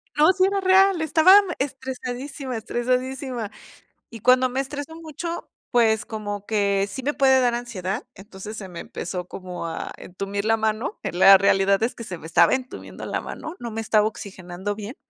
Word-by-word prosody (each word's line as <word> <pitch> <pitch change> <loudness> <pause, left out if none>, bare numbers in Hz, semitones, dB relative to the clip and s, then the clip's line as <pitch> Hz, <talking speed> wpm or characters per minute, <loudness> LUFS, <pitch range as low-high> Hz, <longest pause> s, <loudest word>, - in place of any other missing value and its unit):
No, 305 +4 +6
sí 375 0 +1
era 395 0 +1
real, 380 -2 +5
estaba 320 +4 +6 0.2
estresadísima 265 0 -5
estresadísima. 250 0 -2 0.6
Y 230 - -9
cuando 255 +3 +4
me 255 +2 -3
estreso 290 +3 -5
mucho, 330 +1 -6 0.2
pues 220 -3 +3
como 205 -2 -5
que 200 -2 +1
sí 260 +6 -6
me 290 +3 -1
puede 265 -1 +5
dar 245 -2 +2
ansiedad, 230 -2 -4
entonces, 200 +2 -10
se 195 - -7
me 170 - -8
empezó 180 0 -5
como 180 -2 -7
a 165 - -5
entumir 195 +3 -5
la 225 0 +4
mano. 215 0 -2
En 175 - -4
la 195 0 +9
realidad 195 +1 +3
es 230 - 0
que, 230 - -8
se 180 -5 -6
me 160 - -9
estaba 170 +1 +4
entumiendo 260 -1 -5
la - - -2
mano, 320 +3 -7
no 235 -2 -6
me 225 +1 -3
estaba 215 -1 +3
oxigenando 190 -1 -6
bien. 215 +4 -7
230 Hz, 180 wpm, -23 LUFS, 200-265 Hz, 0.6 s, la